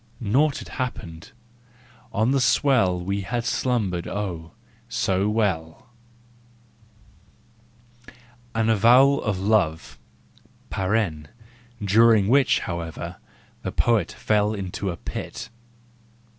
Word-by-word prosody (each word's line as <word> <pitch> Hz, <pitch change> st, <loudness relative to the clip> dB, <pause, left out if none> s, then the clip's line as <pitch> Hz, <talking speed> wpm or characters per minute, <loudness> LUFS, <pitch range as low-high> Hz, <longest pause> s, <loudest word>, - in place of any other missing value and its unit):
Naught 135 Hz, +7 st, +2 dB
had -, -, -8 dB
happened! 90 Hz, -, -6 dB, 0.8 s
On 110 Hz, +5 st, +1 dB
the 135 Hz, -1 st, +2 dB
swell 110 Hz, -6 st, +3 dB
We 100 Hz, +3 st, -2 dB
had 120 Hz, +4 st, -3 dB
slumbered, 105 Hz, -9 st, -1 dB
oh, 90 Hz, -6 st, -5 dB, 0.4 s
so 95 Hz, +2 st, 0 dB
well! 105 Hz, 0 st, -2 dB, 2.2 s
APPENDIX -, -, -16 dB, 0.4 s
363 115 Hz, -, 0 dB
AN 110 Hz, -, +1 dB
AVOWAL 125 Hz, +6 st, +5 dB
OF 105 Hz, -4 st, -1 dB
LOVE 95 Hz, -1 st, -2 dB, 0.5 s
(during 110 Hz, 0 st, +5 dB
which, 135 Hz, +1 st, +3 dB
however, 85 Hz, -3 st, -5 dB, 0.4 s
the -, -, -4 dB
poet 115 Hz, -7 st, +1 dB
fell 105 Hz, 0 st, +1 dB
into 95 Hz, 0 st, -4 dB
a 85 Hz, -, -4 dB
pit). -, -, -7 dB
105 Hz, 100 wpm, -24 LUFS, 90-115 Hz, 2.2 s, AVOWAL